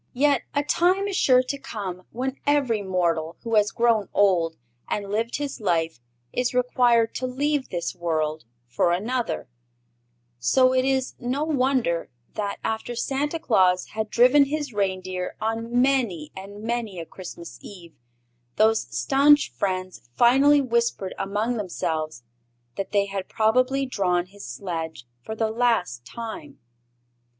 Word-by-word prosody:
Yet 280 -1 +3
a 285 - +2
time 365 +6 +2
is 400 - -3
sure 255 -7 +5
to 280 +2 -4
come 195 -9 -6
when 260 +3 -3
every 270 -7 +2
mortal 170 -4 -1
who 230 -1 -4
has 210 -1 +4
grown 230 -3 +1
old 175 -5 +3 0.3
and 200 -1 -3
lived 225 +3 -1
his 285 -4 -4
life 165 - 0 0.3
is 250 0 -1
required 245 -2 +3
to 255 - -2
leave 285 +2 -1
this 175 -2 -3
world 155 -4 -2 0.2
for 125 +8 +1
another; 235 +7 -2 0.9
so 255 - +4
it 255 0 +2
is 265 -1 0
no 255 +4 -1
wonder 260 - +1 0.2
that, 205 -2 -3
after 225 +2 -3
Santa 285 +6 -1
Claus 185 - +2
had 220 0 -3
driven 255 +6 +5
his 290 -2 -3
reindeer 185 -2 -2
on 230 +2 -1
many 235 - +1
and 200 +2 -9
many 230 -4 -2
a 165 - -5
Christmas 170 -1 -10
Eve, 175 -5 -12 0.6
those 220 +1 +4 0.2
stanch 285 +2 +4
friends 185 - -3
finally 275 - +5
whispered 235 -6 0
among 215 +5 -1
themselves 160 - -3 0.5
that 195 - -4
they 200 -1 +3
had 195 -1 -5
probably 255 +5 +2
drawn 180 -8 0
his 200 +2 -14
sledge 160 +1 -5 0.2
for 220 - -6
the 220 0 0
last 225 - +1
time. 155 - -8
220 Hz, 140 wpm, -24 LUFS, 185-255 Hz, 0.9 s, sure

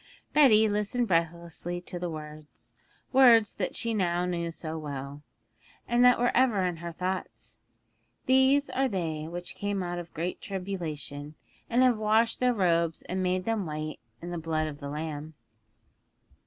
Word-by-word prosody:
Betty 220 -8 +6
listened 210 +4 0
breathlessly 170 0 -1
to 180 0 -6
the 175 0 -3
words 155 -1 -9 0.4
words 235 -5 +6
that 185 - -3
she 230 -1 -1
knew 205 -3 +1 0.2
now 170 -1 -2
so 160 -1 -5
well, 145 -2 -6 0.7
and 240 +1 +3
that 250 -1 +7
were 245 +1 +1
ever 235 -7 +3
in 175 -2 -2
her 170 +1 -6
thoughts: 185 +2 -5 0.7
'These 265 +2 +4
are 270 +1 +1
they 160 -8 -3
which 175 +1 -6
came 205 -2 -2
out 175 0 -3
of 170 -1 -9
great 170 +3 -3
tribulation, 160 -6 -5 0.3
and 245 +2 +3
have 245 -4 +3
washed 220 +2 +2
their 250 0 +3
robes 170 -4 +1
and 185 +1 -3
made 185 0 0
them 220 -5 -1
white 155 0 -5 0.2
in 175 - -5
the 175 - -3
blood 160 -1 -1
of 150 -2 -6
the 140 - -6
Lamb.' 155 +1 -5
180 Hz, 160 wpm, -28 LUFS, 160-220 Hz, 0.7 s, that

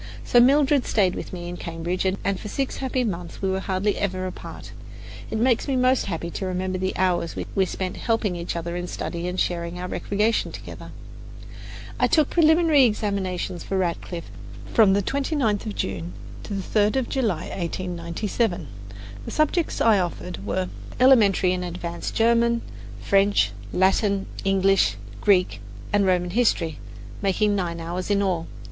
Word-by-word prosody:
So 240 - +4
Mildred 280 +2 +4
stayed 190 -4 +2
with - - -6
me 175 -1 -6
in 175 0 -6
Cambridge, 170 +3 -3
and 190 0 -1
for - - -7
six 270 +5 -2
happy 260 -1 -1
months 180 -6 -4
we 190 -1 0
were 190 - 0
hardly 190 +1 -1
ever 185 -2 -1
apart. 185 - -8 0.6
It - - -2
makes 240 +3 +2
me 275 - 0
most 255 -1 +2
happy 170 -2 -3
to 190 - -4
remember 185 0 -2
the 190 0 -2
hours 175 -2 +1 0.2
we 190 - +3
spent 185 0 -4
helping 225 -5 0
each 170 0 -4
other 170 +1 -3
in 175 0 -3
study 170 0 -4
and 180 +1 -3
sharing 170 0 -1
our 180 - -4
recreation 210 +4 0
together. - - -9 1.1
I - - +4
took 310 -3 +3
my - - -10
preliminary 320 -4 +5
examinations 195 -5 -2
for 195 - -2
Radcliffe 170 - -3 0.4
from 210 -4 +6
the 200 0 +2
29th 270 - 0
of 210 - -4
June 90 -2 -3 0.3
to 205 - -4
the 195 - -3
3rd 210 +2 +2
of 265 -2 0
July 215 - 0
in - - -6
1897. 175 - -2 0.6
The - - -5
subjects 310 +2 0
I 220 -3 +5
offered 95 - -4
were 100 -2 -1 0.3
Elementary 210 -8 +5
and 180 0 -2
Advanced 170 -1 -5
German, 235 +1 +3 0.4
French, 195 - +3 0.2
Latin, 195 - +2 0.2
English, 195 - +3
and 105 0 -14
Greek 180 - +3 0.3
and 200 -1 +3
Roman 180 -1 +1
history, 175 -8 +1 0.4
making 205 +1 +2
nine 170 -3 -2
hours 175 +3 -4
in 200 -1 +2
all. 175 -4 -1
190 Hz, 165 wpm, -24 LUFS, 175-220 Hz, 1.1 s, from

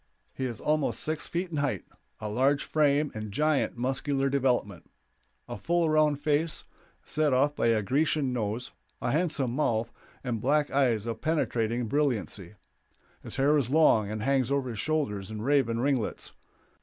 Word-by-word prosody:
He 130 - -3
is 120 -3 -4
almost 155 -1 0
six 155 0 -3
feet 175 +1 -3
in 155 - -3
height, 140 -10 -1 0.3
of 105 -1 -4
large 135 +4 +2
frame 150 -1 +2
and 110 -1 -6
giant 150 +2 +1
muscular 135 +2 -1
development; 125 - 0 0.6
a - - -6
full 170 - +1
round 150 -2 +2
face, 155 +2 +1 0.4
set 150 -3 +1
off 145 +3 +2
by - - +1
a 110 -2 +2
Grecian 140 +2 +1
nose, 115 +1 -3 0.3
a - - -1
handsome 145 -6 0
mouth, 115 -6 0 0.3
and 120 -4 -2
black 145 +4 +2
eyes 120 -6 +2
of 115 -1 -4
penetrating 120 -7 0
brilliancy. 105 - -1 0.7
His - - -8
hair 140 +3 +3
is 125 -4 -2
long 130 -9 +4
and 110 0 -4
hangs 135 -1 +1
over 135 -3 0
his 110 - -6
shoulders 110 -11 -1
in 110 -1 -5
raven 130 -4 +2
ringlets. 130 -3 -1
135 Hz, 160 wpm, -28 LUFS, 115-150 Hz, 0.7 s, long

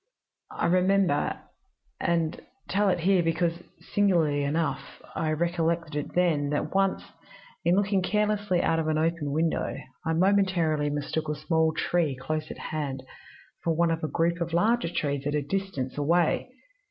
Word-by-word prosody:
I - - -2
remember 185 -3 +2 0.6
and 165 -2 0 0.3
tell 200 +1 +2
it 180 -2 0
here 190 +1 +4
because, 165 +1 0 0.3
singularly 165 -8 +3
enough, 155 +2 -2
I 160 - -1
recollected 165 -1 0
it 150 - -4
then 160 -5 +2
that 145 - -2
once, 195 0 +1 0.6
in 170 +1 +3
looking 200 -1 +2
carelessly 205 -2 +1
out 165 0 +2
of 160 - -1
an 155 0 +1
open 160 -2 0
window, 160 +2 0 0.3
I 160 -1 0
momentarily 170 -5 +2
mistook 150 +2 -2
a 150 - -1
small 160 +1 +1
tree 165 -6 +1
close 155 +3 -3
at - - -7 0.2
hand 140 -4 -3 0.6
for 165 -1 +1
one 170 0 +2
of 165 0 -2
a - - +1
group 170 +2 0
of 170 0 -2
larger 220 +3 +2
trees 140 -4 -2
at 145 - 0
a - - +3
little 195 +7 +1
distance 160 -10 -5
away. 170 - +2
165 Hz, 160 wpm, -27 LUFS, 155-180 Hz, 0.6 s, here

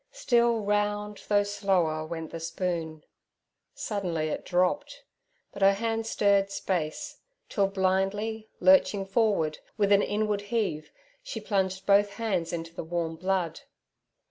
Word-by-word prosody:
Still 235 - +2
round, 205 0 -1
though 205 -1 +4
slower, 190 -6 0
went 165 -1 -6
the 165 - -5
spoon. 165 -2 -3 0.7
Suddenly 175 -7 -2
it - - -4
dropped, 280 +11 0 0.5
but 200 - -10
her 195 0 +6
hand 225 +2 -2
stirred 200 -2 +3
space, 175 -5 -3 0.3
till 200 -2 +2
blindly 195 +3 -1
lurching 245 -8 +4
forward, 195 -7 +1 0.2
with 205 -1 +2
an 200 0 +6
inward 210 -1 0
heave, 185 -10 -1 0.3
she - - -6
plunged 190 -2 -1
both 200 0 +4
hands 200 -6 -1
into 165 -1 -5
the - - -5
warm 165 0 -2
blood. 185 -1 -1
195 Hz, 130 wpm, -28 LUFS, 170-210 Hz, 0.7 s, her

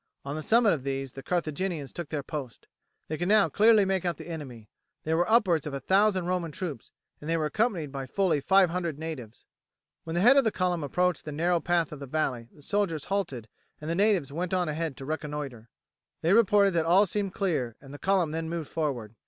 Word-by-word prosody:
On 140 - -4
the 155 - -3
summit 225 +4 +4
of 145 -5 -4
these 135 -1 -3
the 135 - -8
Carthaginians 170 -2 -2
took 170 -4 -6
their 150 -3 -3
post. 135 -5 -7 0.4
They 155 - -4
could 175 - -1
now 205 -4 +5
clearly 215 +4 +5
make 190 -2 0
out 175 -2 -1
the - - -10
enemy; 130 -9 -8 0.4
there 160 +1 0
were 175 +4 +1
upwards 190 -10 +3
of 140 - -4
a - - -3
thousand 190 +4 +2
Roman 180 -3 -1
troops, 150 - -6 0.3
and 150 - -7
they 165 - +2
were 155 - 0
accompanied 180 - 0
by 135 -1 -5
fully 175 0 +1
five 190 +1 +4
hundred 170 -4 -2
natives. 145 -8 -7 0.6
When 165 0 -5
the 175 - +2
head 260 +5 +7
of 275 - +6
the 220 - +1
column 180 -4 -1
approached 180 +4 0
the 150 - -6
narrow 170 +4 +1
path 170 -2 0
of 150 - -8
the 140 - -7
valley 130 -5 -2
the 145 - -18
soldiers 165 -5 -1
halted 135 - -2 0.3
and 155 +2 -4
the - - +1
natives 185 -7 +2
went 180 +3 -2
on 180 -1 0
ahead 155 -2 -3
to 135 - -8
reconnoitre. 145 -6 -5 0.5
They 170 +4 +3
reported 205 -2 +5
that 165 -2 0
all 190 +5 +5
seemed 200 0 -3
clear, 145 - -1
and 135 0 -13
the 145 - -9
column 185 -5 +1
then 160 0 -3
moved 165 -3 -5
forward. 130 -9 -2
165 Hz, 220 wpm, -28 LUFS, 145-185 Hz, 0.6 s, head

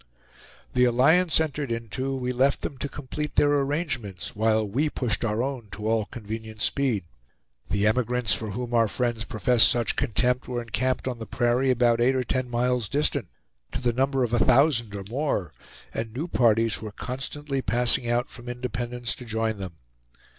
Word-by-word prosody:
The 125 0 +4
alliance 155 +9 +4
entered 150 -4 -2
into, 115 +4 -3
we 125 -1 -2
left 135 +3 +2
them - - -4
to 140 - -2
complete 150 +2 -5
their 145 0 +4
arrangements, 135 - -3
while 110 0 +2
we 140 +10 0
pushed 125 -7 -1
our 115 +1 0
own 130 -5 -4
to 105 +1 -4
all 110 -1 +2
convenient 110 0 -6
speed. 130 -9 +1 0.7
The 100 +1 +1
emigrants 120 0 +2
for 110 - -2
whom 120 +4 -4
our 115 -1 +4
friends 120 +1 -1
professed 110 0 +4
such 120 -1 0
contempt 125 -1 +1
were 125 -1 -2
encamped 130 +3 -1
on 125 -2 -3
the 115 - -6
prairie 125 +2 +1
about 120 -2 +3
eight 130 +2 +4
or 130 - +1
ten 130 0 -2
miles 120 -2 0
distant, 140 -6 0 0.5
to - - -1
the 120 -2 +1
number 135 +1 +1
of 120 -1 -2
a 120 - +3
thousand 125 -5 +3
or 100 - -5
more, 120 - -1 0.4
and 115 0 -3
new 140 +9 -4
parties 115 -6 +2
were 110 -2 -6
constantly 135 +4 -4
passing 120 -1 +2
out 120 +1 +1
from 120 0 -10
Independence 120 -1 -3
to - - -9
join 110 -2 -2
them. 95 -3 -6
120 Hz, 175 wpm, -26 LUFS, 115-130 Hz, 0.7 s, The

